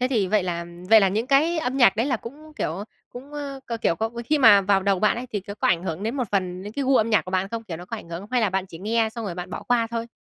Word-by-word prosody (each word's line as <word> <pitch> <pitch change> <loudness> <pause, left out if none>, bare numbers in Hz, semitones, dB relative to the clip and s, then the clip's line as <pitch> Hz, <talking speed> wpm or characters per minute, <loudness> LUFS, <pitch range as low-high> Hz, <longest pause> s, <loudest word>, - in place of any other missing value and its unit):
Thế 255 - +1
thì 225 -7 +1
vậy 205 +1 +2
là 170 -1 -3 0.3
vậy 220 -1 +9
là 195 - +4
những 215 +5 -1
cái 310 +5 +3
âm 255 -3 -2
nhạc 245 -8 +5
đấy 230 - +1
là 260 -4 +1
cũng, 300 +8 -11
kiểu, - - -1
ơ, 200 - -5 0.2
cũng, 265 +4 -11
ơ, 280 -2 -6 0.2
k 225 - -16
kiểu 165 - +1
có 225 +1 -2
khi 300 +4 +1
mà 210 -6 +8
vào 195 0 +2
đầu 195 -1 +2
bạn 215 +2 +3
ấy 250 - -5
thì 205 - -1
có 200 +1 -8
có 210 - 0
ảnh 170 0 +2
hưởng 175 +1 -4
đến 230 +6 -2
một 255 - 0
phần 185 -2 -1
đến 205 +2 -8
cái 280 +4 -2
gu 265 0 +4
âm 225 +1 +2
nhạc 215 - +3
của 185 - -7
bạn 190 +1 0
không? 230 +2 -5
Kiểu, 175 -6 -6
nó 175 - -9
có - - -6
ảnh - - -11
hưởng? 170 +4 -6
Hay 250 - +2
là 215 -4 +1
bạn 190 0 -1
chỉ 165 - -11
nghe 220 +4 +1
xong 230 -2 -5
rồi 185 - -4
bạn 180 +1 -7
bỏ - - -6
qua 240 -2 +1
thôi? 230 0 -3
220 Hz, 340 wpm, -24 LUFS, 190-250 Hz, 0.3 s, vậy